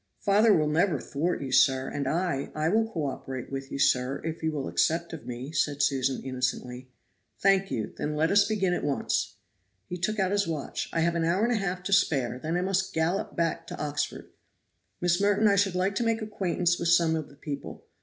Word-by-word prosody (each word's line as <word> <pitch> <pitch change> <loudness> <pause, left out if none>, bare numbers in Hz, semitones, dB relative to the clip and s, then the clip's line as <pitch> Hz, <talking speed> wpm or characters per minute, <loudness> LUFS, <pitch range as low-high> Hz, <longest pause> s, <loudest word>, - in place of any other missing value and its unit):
"Father 210 +2 +4
will 155 -6 +3
never 155 0 +2
thwart 150 +4 -2
you, 135 - -5
sir, 130 0 +4
and 140 -2 -3
I 170 -3 -1
I 155 +1 +1
will 225 +3 +2
co 160 -7 -2
operate 130 -2 -5
with 135 0 -5
you, - - -3
sir, 130 0 +2
if 160 0 -4
you 160 0 0
will 145 -3 -3
accept 170 +1 0
of 160 - -8
me," 125 +3 -6
said 145 -3 0
Susan 135 -2 0
innocently. 125 -1 -3 0.5
"Thank 195 0 +3
you, 110 - -3
then 150 0 -3
let 160 +2 +2
us 205 0 +5
begin 195 -4 +1
at - - -2
once." 145 -2 -1 0.5
He 180 - -5
took 215 +5 -1
out 190 -2 +1
his 200 -2 +1
watch. 155 -4 -4
"I 165 - 0
have 170 +1 +2
an 170 -1 0
hour 175 +5 +1
and 240 +1 +2
a - - +1
half 180 -1 -3
to 195 - -1
spare, 130 -10 +2
then 160 +5 -2
I - - 0
must 190 0 -1
gallop 165 +5 0
back 165 0 -1
to - - -7
Oxford. 145 -1 -3 0.7
Miss 175 +1 +2
Merton, 205 +1 +3
I 200 - +4
should 195 -2 +2
like 185 +2 +1
to - - +1
make 225 -1 0
acquaintance 180 -4 0
with 170 - -1
some 170 -1 +4
of 155 -2 -4
the 140 - -17
people. 140 0 -7
165 Hz, 220 wpm, -27 LUFS, 140-190 Hz, 0.7 s, us